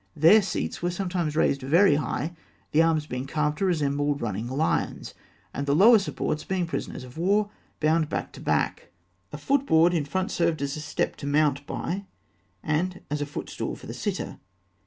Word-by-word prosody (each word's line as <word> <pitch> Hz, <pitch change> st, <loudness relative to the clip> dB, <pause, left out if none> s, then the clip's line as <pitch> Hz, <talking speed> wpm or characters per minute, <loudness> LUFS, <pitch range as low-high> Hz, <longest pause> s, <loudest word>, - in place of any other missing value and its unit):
Their 165 Hz, +8 st, +7 dB
seats 190 Hz, -, -3 dB
were 175 Hz, -, 0 dB
sometimes 175 Hz, -4 st, -2 dB
raised 140 Hz, -3 st, +2 dB
very 160 Hz, +7 st, +5 dB
high, 150 Hz, +3 st, -2 dB, 0.4 s
the 155 Hz, -, +4 dB
arms 160 Hz, -2 st, +2 dB
being 125 Hz, -2 st, -5 dB
carved 150 Hz, 0 st, -1 dB
to 195 Hz, -, +1 dB
resemble 145 Hz, -4 st, +1 dB
running 110 Hz, -4 st, -3 dB
lions, 140 Hz, +6 st, -1 dB, 0.4 s
and 140 Hz, +1 st, -3 dB
the 140 Hz, -, +3 dB
lower 220 Hz, +6 st, +7 dB
supports 155 Hz, -5 st, -3 dB
being 185 Hz, -2 st, -1 dB
prisoners 165 Hz, -5 st, -5 dB
of 125 Hz, +4 st, -11 dB
war, 205 Hz, +4 st, +2 dB, 0.3 s
bound 155 Hz, 0 st, +2 dB
back -, -, -3 dB
to -, -, -12 dB
back -, -, -1 dB, 0.4 s
(fig. 150 Hz, -, -8 dB
270). -, -, -18 dB
A -, -, -20 dB
foot 275 Hz, 0 st, +2 dB
board 165 Hz, +2 st, +5 dB
in 160 Hz, -4 st, 0 dB
front 185 Hz, +8 st, -2 dB
served 165 Hz, -4 st, 0 dB
as 140 Hz, 0 st, -2 dB
a 155 Hz, -, -5 dB
step 150 Hz, -1 st, -2 dB
to 140 Hz, -, -6 dB
mount 145 Hz, -1 st, +1 dB
by, 195 Hz, +3 st, -3 dB, 0.6 s
and 175 Hz, +4 st, -1 dB
as 150 Hz, 0 st, -1 dB
a 145 Hz, -, -2 dB
foot 145 Hz, -, -6 dB
stool -, -, -4 dB
for -, -, -13 dB
the -, -, -6 dB
sitter. -, -, -4 dB
155 Hz, 200 wpm, -26 LUFS, 145-180 Hz, 0.6 s, Their